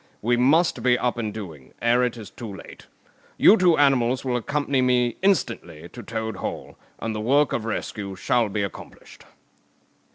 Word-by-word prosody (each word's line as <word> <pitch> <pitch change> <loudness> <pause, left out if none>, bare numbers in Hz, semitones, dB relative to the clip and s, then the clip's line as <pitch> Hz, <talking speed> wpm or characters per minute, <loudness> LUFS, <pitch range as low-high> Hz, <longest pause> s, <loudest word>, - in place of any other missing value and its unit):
We 120 +2 +2
must 155 +8 +3
be 125 -1 +3
up 120 -1 -1
and 110 -2 -2
doing, 80 -12 -10
ere 120 +1 +2
it 125 -1 -1
is 110 -3 -10
too 115 -4 -8
late. 95 - -12 0.5
You 210 - +7
two 180 -5 +3
animals 130 -2 +2
will 125 -1 0
accompany 140 +2 -1
me 125 -2 +2
instantly 150 - -1
to 120 - -10
Toad 110 -3 -5
Hall, - - -6 0.2
and 115 - -4
the 110 - -4
work 140 +5 +2
of 110 - -2
rescue 100 -3 -4
shall 115 +4 +1
be 100 0 -2
accomplished." 100 - -10
120 Hz, 170 wpm, -24 LUFS, 110-130 Hz, 0.5 s, You